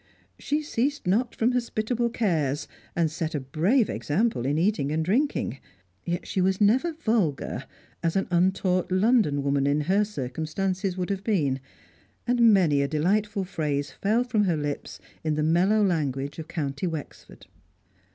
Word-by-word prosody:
She 300 Hz, +1 st, -1 dB
ceased 285 Hz, +1 st, -1 dB
not 225 Hz, +7 st, +1 dB
from 230 Hz, +2 st, +2 dB
hospitable 235 Hz, -1 st, -1 dB
cares, 160 Hz, -, 0 dB, 0.3 s
and 165 Hz, -3 st, +1 dB
set 160 Hz, 0 st, -3 dB
a -, -, 0 dB
brave 170 Hz, -, +2 dB
example 155 Hz, -, 0 dB
in 145 Hz, +2 st, +1 dB
eating 165 Hz, -5 st, +1 dB
and 160 Hz, +1 st, 0 dB
drinking. 210 Hz, -, 0 dB, 0.4 s
Yet 175 Hz, +1 st, -3 dB
she 190 Hz, -, -1 dB
was 190 Hz, +1 st, +1 dB
never 250 Hz, +11 st, +3 dB
vulgar, 220 Hz, -, -1 dB, 0.4 s
as 165 Hz, -1 st, 0 dB
an 195 Hz, -, +1 dB
untaught 185 Hz, +1 st, +1 dB
London 185 Hz, -, +3 dB
woman 140 Hz, 0 st, +1 dB
in 145 Hz, +1 st, +2 dB
her 190 Hz, +7 st, +2 dB
circumstances 180 Hz, +3 st, -3 dB
would 180 Hz, +2 st, -2 dB
have 195 Hz, -1 st, -3 dB
been, 150 Hz, -, +1 dB, 0.7 s
and 240 Hz, -2 st, +5 dB
many 165 Hz, -8 st, +4 dB
a 140 Hz, -, +1 dB
delightful 195 Hz, +7 st, 0 dB
phrase 145 Hz, -6 st, -2 dB
fell 215 Hz, -, +1 dB
from 220 Hz, -4 st, +1 dB
her 170 Hz, -4 st, +1 dB
lips 145 Hz, -1 st, -4 dB, 0.2 s
in 155 Hz, -1 st, 0 dB
the 150 Hz, -, 0 dB
mellow 185 Hz, +7 st, +3 dB
language 145 Hz, -5 st, -1 dB
of 160 Hz, -, -6 dB
County 145 Hz, +1 st, -3 dB
Wexford. 160 Hz, -4 st, -8 dB
180 Hz, 155 wpm, -26 LUFS, 150-215 Hz, 0.7 s, and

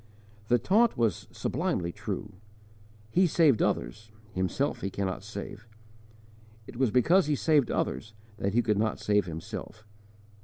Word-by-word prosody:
The 120 Hz, -, +4 dB
taunt 210 Hz, -, +3 dB
was 115 Hz, -6 st, 0 dB
sublimely 85 Hz, -1 st, -2 dB
true: 105 Hz, +3 st, -5 dB, 0.8 s
"He 185 Hz, +6 st, +4 dB
saved 155 Hz, -7 st, +4 dB
others, 85 Hz, -, -1 dB, 0.2 s
Himself 95 Hz, +10 st, -1 dB
He 95 Hz, -, -2 dB
cannot 95 Hz, -1 st, -3 dB
save"; 105 Hz, +1 st, -8 dB, 1.0 s
it -, -, -11 dB
was 130 Hz, 0 st, +2 dB
because 150 Hz, -, +4 dB
he 150 Hz, -, +2 dB
saved 145 Hz, -3 st, +3 dB
others 105 Hz, -, -2 dB, 0.2 s
that 100 Hz, +1 st, -2 dB
He 120 Hz, -, +4 dB
could 105 Hz, -3 st, +1 dB
not 110 Hz, 0 st, 0 dB
save 105 Hz, -2 st, +1 dB
Himself. 90 Hz, +5 st, -7 dB
110 Hz, 140 wpm, -28 LUFS, 100-135 Hz, 1.0 s, The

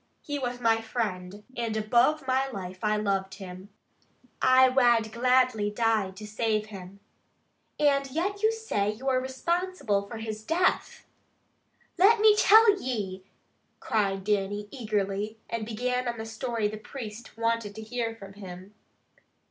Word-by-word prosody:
He 290 Hz, -1 st, -3 dB
was 245 Hz, -2 st, -3 dB
my 225 Hz, -2 st, +2 dB
friend, 205 Hz, -4 st, -4 dB
and 230 Hz, -2 st, -2 dB
above 240 Hz, +7 st, +2 dB
my 265 Hz, +1 st, +1 dB
life 185 Hz, -5 st, -7 dB
I 215 Hz, 0 st, +1 dB
loved 195 Hz, -2 st, -1 dB
him. 190 Hz, 0 st, -10 dB, 0.7 s
I 260 Hz, 0 st, +6 dB
wad 240 Hz, -4 st, +3 dB
gladly 250 Hz, -2 st, +2 dB
have 210 Hz, -, -5 dB
died 220 Hz, -5 st, +1 dB
to 215 Hz, -, -8 dB
save 215 Hz, 0 st, -1 dB
him." 200 Hz, -2 st, -11 dB, 0.8 s
"And 280 Hz, -2 st, +2 dB
yet 375 Hz, +8 st, -2 dB
you 435 Hz, +1 st, +4 dB
say 440 Hz, -, -1 dB
you 240 Hz, +6 st, -8 dB
are 255 Hz, -1 st, +2 dB
responsible 265 Hz, -, -1 dB
for 230 Hz, -, -7 dB
his 220 Hz, -1 st, -6 dB
death!" 340 Hz, +7 st, 0 dB, 0.9 s
"Let 420 Hz, +5 st, +6 dB
me 430 Hz, 0 st, +6 dB
tell 420 Hz, -1 st, +6 dB
ye!" 195 Hz, -7 st, -4 dB, 0.5 s
cried 195 Hz, -3 st, 0 dB
Dannie 205 Hz, 0 st, -1 dB
eagerly, 210 Hz, -3 st, -2 dB
and 230 Hz, -2 st, -4 dB
began 250 Hz, +2 st, -1 dB
on 235 Hz, -1 st, -2 dB
the 220 Hz, -, -5 dB
story 225 Hz, -1 st, -2 dB
the 215 Hz, +1 st, -6 dB
priest 220 Hz, -1 st, -9 dB
wanted 230 Hz, -2 st, -1 dB
to 220 Hz, -, -7 dB
hear 230 Hz, 0 st, -3 dB
from 195 Hz, -3 st, -12 dB
him. 190 Hz, 0 st, -10 dB
225 Hz, 150 wpm, -27 LUFS, 205-255 Hz, 0.9 s, I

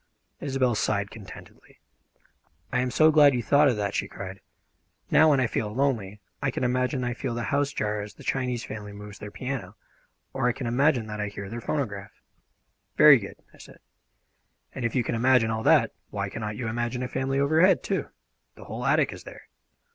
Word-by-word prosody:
Isobel 135 Hz, -3 st, 0 dB
sighed 100 Hz, -1 st, -1 dB
contentedly. 105 Hz, -3 st, -13 dB, 0.9 s
"I 125 Hz, -, +2 dB
am 125 Hz, 0 st, 0 dB
so 155 Hz, +5 st, +5 dB
glad 145 Hz, -3 st, +6 dB
you 120 Hz, -, -1 dB
thought 145 Hz, +4 st, +4 dB
of 125 Hz, -5 st, +1 dB
that!" 100 Hz, -1 st, -2 dB
she -, -, -1 dB
cried. 95 Hz, 0 st, -8 dB, 0.7 s
"Now, 160 Hz, +1 st, +6 dB
when 140 Hz, -3 st, +4 dB
I 130 Hz, -, +3 dB
feel 110 Hz, -2 st, -2 dB
lonely, 110 Hz, -6 st, -1 dB, 0.2 s
I 140 Hz, -, +1 dB
can 130 Hz, -, -3 dB
imagine 125 Hz, +1 st, 0 dB
I 120 Hz, 0 st, -1 dB
feel 120 Hz, 0 st, -4 dB
the 120 Hz, -, -3 dB
house 140 Hz, 0 st, +1 dB
jar 105 Hz, -4 st, -2 dB
as 105 Hz, 0 st, -9 dB
the -, -, -14 dB
Chinese 125 Hz, -3 st, -1 dB
family 105 Hz, -1 st, -7 dB
move 105 Hz, 0 st, -10 dB
their 105 Hz, -, -7 dB
piano, 120 Hz, -5 st, -5 dB, 0.6 s
or 130 Hz, -2 st, 0 dB
I -, -, 0 dB
can 130 Hz, -, -6 dB
imagine 125 Hz, 0 st, +2 dB
that 105 Hz, -1 st, -5 dB
I 105 Hz, -, -2 dB
hear 100 Hz, -1 st, -7 dB
their 120 Hz, +1 st, -5 dB
phonograph." 105 Hz, -8 st, -3 dB, 0.8 s
"Very 150 Hz, -4 st, +8 dB
good," 100 Hz, -, -8 dB, 0.2 s
I -, -, -19 dB
said; -, -, -14 dB, 1.0 s
"and 130 Hz, -, -4 dB
if 115 Hz, -, -2 dB
you 125 Hz, -, +2 dB
can -, -, -3 dB
imagine 120 Hz, -1 st, +3 dB
all 110 Hz, 0 st, -2 dB
that, -, -, +4 dB, 0.2 s
why 100 Hz, -1 st, -3 dB
cannot 105 Hz, 0 st, -5 dB
you 120 Hz, -, -3 dB
imagine 120 Hz, +2 st, -2 dB
a -, -, -2 dB
family 135 Hz, +1 st, -1 dB
overhead, 160 Hz, +7 st, +4 dB
too? -, -, -2 dB, 0.5 s
The -, -, -12 dB
whole -, -, -5 dB
attic -, -, +2 dB
is -, -, -11 dB
there. -, -, -13 dB
120 Hz, 200 wpm, -26 LUFS, 105-135 Hz, 1.0 s, Very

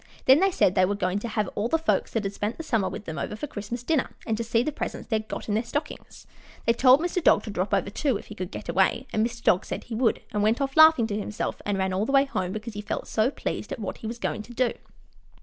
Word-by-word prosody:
Then 265 Hz, +3 st, +7 dB
they 390 Hz, +2 st, +4 dB
said 190 Hz, -, +2 dB
they 185 Hz, -1 st, +3 dB
were 200 Hz, +2 st, -1 dB
going 190 Hz, 0 st, -1 dB
to 235 Hz, -, -5 dB
have 215 Hz, -3 st, -1 dB
all 205 Hz, +2 st, -1 dB
the 325 Hz, -, +2 dB
folks 325 Hz, -, 0 dB
that 225 Hz, -, 0 dB
had 195 Hz, 0 st, -3 dB
spent 210 Hz, +3 st, -3 dB
the 325 Hz, -, -5 dB
summer 225 Hz, -10 st, 0 dB
with 210 Hz, -, -7 dB
them 160 Hz, -, -5 dB
over -, -, -3 dB
for 220 Hz, -, -4 dB
Christmas 230 Hz, -1 st, -6 dB
dinner 295 Hz, 0 st, +1 dB, 0.2 s
and 225 Hz, -, 0 dB
to 230 Hz, -, -3 dB
see 230 Hz, +1 st, +1 dB
the 305 Hz, -, -1 dB
presents -, -, -5 dB
they 220 Hz, -, +2 dB
had 215 Hz, 0 st, -6 dB
got -, -, -6 dB
in 210 Hz, -, -1 dB
their 215 Hz, -, +2 dB
stockings. 285 Hz, +6 st, -6 dB, 0.4 s
They 230 Hz, -, +4 dB
told 255 Hz, +4 st, +6 dB
Mr. 350 Hz, 0 st, -1 dB
Dog -, -, +5 dB
to 215 Hz, -, -6 dB
drop 190 Hz, 0 st, -2 dB
over, 200 Hz, 0 st, +1 dB
too, 265 Hz, 0 st, 0 dB
if -, -, -12 dB
he -, -, -9 dB
could 185 Hz, -4 st, -5 dB
get -, -, -8 dB
away, 190 Hz, +8 st, +2 dB
and 215 Hz, -, +2 dB
Mr. 235 Hz, 0 st, -4 dB
Dog 185 Hz, -, +4 dB
said -, -, -5 dB
he 240 Hz, -, -8 dB
would, 230 Hz, 0 st, +1 dB
and 210 Hz, -, 0 dB
went 220 Hz, +4 st, +2 dB
off 275 Hz, -1 st, -2 dB
laughing 315 Hz, -6 st, +7 dB
to 210 Hz, -2 st, -3 dB
himself 210 Hz, 0 st, -4 dB
and 205 Hz, -1 st, 0 dB
ran 190 Hz, -1 st, 0 dB
all 200 Hz, +4 st, 0 dB
the -, -, -1 dB
way 275 Hz, 0 st, +5 dB
home 185 Hz, -9 st, -2 dB
because 215 Hz, +2 st, -6 dB
he 205 Hz, -, -5 dB
felt 210 Hz, -, -4 dB
so 220 Hz, +3 st, +2 dB
pleased -, -, -4 dB
at 275 Hz, -, -3 dB
what 210 Hz, -5 st, -5 dB
he 220 Hz, -, -7 dB
was 230 Hz, +1 st, -5 dB
going 225 Hz, -, -2 dB
to 235 Hz, +3 st, -12 dB
do. 250 Hz, -1 st, +1 dB
220 Hz, 295 wpm, -26 LUFS, 205-255 Hz, 0.4 s, Then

